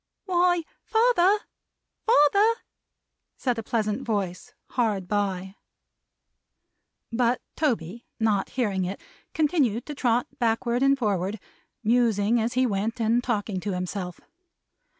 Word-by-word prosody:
"Why, 355 -2 +2 0.2
father, 445 -4 +4 0.7
father!" 405 +4 +5 0.8
said 245 -3 -1
a - - -2
pleasant 215 -2 -1
voice, 205 +1 -3 0.2
hard 210 -7 0
by. 195 -1 -2 1.5
But 240 +1 +2 0.2
Toby, 235 - -1
not 210 -3 +1
hearing 205 -7 -1
it 185 +2 -4 0.4
continued 285 - +1
to 300 - -6
trot 245 -3 +1
backward 235 +1 +1
and 275 0 +4
forward: 205 -3 -1 0.4
musing 230 -1 +3
as 230 +2 -1
he 255 +1 +3
went, 220 +2 -1
and 230 +2 +2
talking 210 -5 -1
to 200 +1 -3
himself. 180 0 -4
230 Hz, 110 wpm, -26 LUFS, 205-260 Hz, 1.5 s, father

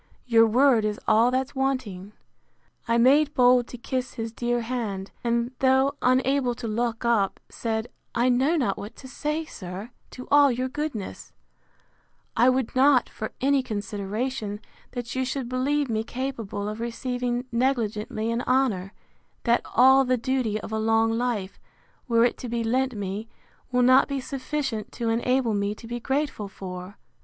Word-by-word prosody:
Your 230 -2 +5
word 245 0 +4
is 210 0 -1
all 225 +3 +5
that's 260 +1 -1
wanting. 255 -8 -2 0.7
I 230 0 +2
made 285 +5 +4
bold 245 -1 +5
to 245 - -9
kiss 255 +2 -3
his 225 -2 -4
dear 240 0 -1
hand; 225 -5 -4
and, 235 0 0
though 265 +1 +3
unable 255 0 +2
to 235 -1 -5
look 230 +1 -2
up, 220 -5 +2
said—I 230 +1 -3
know 265 +7 +3
not 245 - 0
what 205 - -8
to 265 - -11
say, 300 +4 -3
sir, 190 -2 -8 0.2
to 255 - -10
all 285 -1 +6
your 255 +2 -2
goodness: 270 - -5 1.0
I 240 +3 +5
would 255 -2 0
not, 265 -1 +4
for 215 - -6
any 275 +1 +3
consideration, 210 +1 -3 0.3
that 245 -2 -5
you 260 - 0
should 260 -1 -3
believe 275 +3 0
me 220 -2 -1
capable 230 -5 -4
of 215 +1 -5
receiving 245 +1 -2
negligently 230 -3 -1
an 230 +1 -1
honour, 220 -7 +1 0.5
that 235 0 +3
all 265 +3 +7
the 255 -1 +1
duty 245 -3 -1
of - - -8
a 220 - -1
long 225 +1 +2
life, 225 -5 -2 0.5
were 230 -1 +4
it 245 - 0
to 250 - -6
be 235 0 -1
lent 255 +2 0
me, 205 +2 -4 0.4
will 250 0 +3
not 255 +2 +6
be 280 -1 -2
sufficient 265 -3 -3
to 235 -2 -2
enable 240 +1 +1
me 200 0 -1
to 230 - -13
be 240 +1 -4
grateful 265 -4 -2
for. 185 0 -8
240 Hz, 160 wpm, -25 LUFS, 220-260 Hz, 1.0 s, all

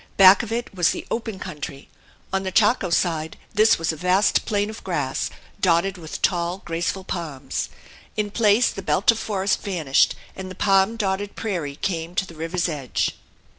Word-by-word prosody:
Back 195 0 +9
of 230 -2 -7
it 235 -1 -3
was 175 -3 +3
the - - -3
open 225 -3 -3
country; 150 -7 -7 0.5
on 190 - +2
the 190 -1 -3
Chaco 210 -1 +3
side 160 -2 0 0.2
this 215 +1 +5
was 165 0 0
a - - -6
vast 180 +5 +2
plain 205 -1 +1
of 220 - -11
grass, 145 -8 -1 0.3
dotted 180 +1 +2
with 160 -2 -7
tall, 175 +1 0
graceful 170 +3 -2
palms. 150 -8 -4 0.5
In 210 -1 -1
places 215 +2 +3
the 195 - -6
belt 195 +3 +3
of 225 - -4
forest 195 -2 0
vanished 165 -9 +2 0.2
and 190 0 -6
the 185 - -8
palm 195 +2 +3
dotted 200 -1 -2
prairie 170 -10 -3
came 165 +1 -3
to 195 - +1
the 170 - -12
river's 165 +3 -2
edge. 145 -6 -2
185 Hz, 175 wpm, -23 LUFS, 165-200 Hz, 0.5 s, Back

